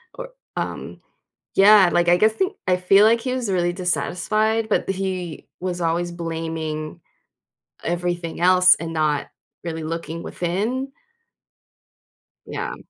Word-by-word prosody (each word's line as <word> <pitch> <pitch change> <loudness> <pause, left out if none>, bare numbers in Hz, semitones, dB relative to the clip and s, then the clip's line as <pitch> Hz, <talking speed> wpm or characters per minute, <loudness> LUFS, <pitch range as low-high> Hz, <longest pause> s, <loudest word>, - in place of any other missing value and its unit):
or, - - -7 0.3
um, - - -5 0.5
yeah, 195 -2 +7
like 175 0 +2
I 175 - +5
guess 215 +4 +3
think? 380 - -1
I 180 -1 +3
feel 195 +3 +5
like 230 +1 +4
he 255 +1 -2
was 245 -5 -2
really 175 -1 +1
dissatisfied, 215 +5 0
but 205 - 0
he 185 -4 -4
was 180 -1 -3
always 170 +1 0
blaming 160 -1 -5 0.8
everything 175 -1 -3
else 185 +1 +6
and 165 0 -6
not 155 -3 0 0.4
really 160 -2 -4
looking 165 +1 -5
within? 220 +10 -2 1.6
Yeah. - - -4
180 Hz, 125 wpm, -22 LUFS, 165-205 Hz, 1.6 s, yeah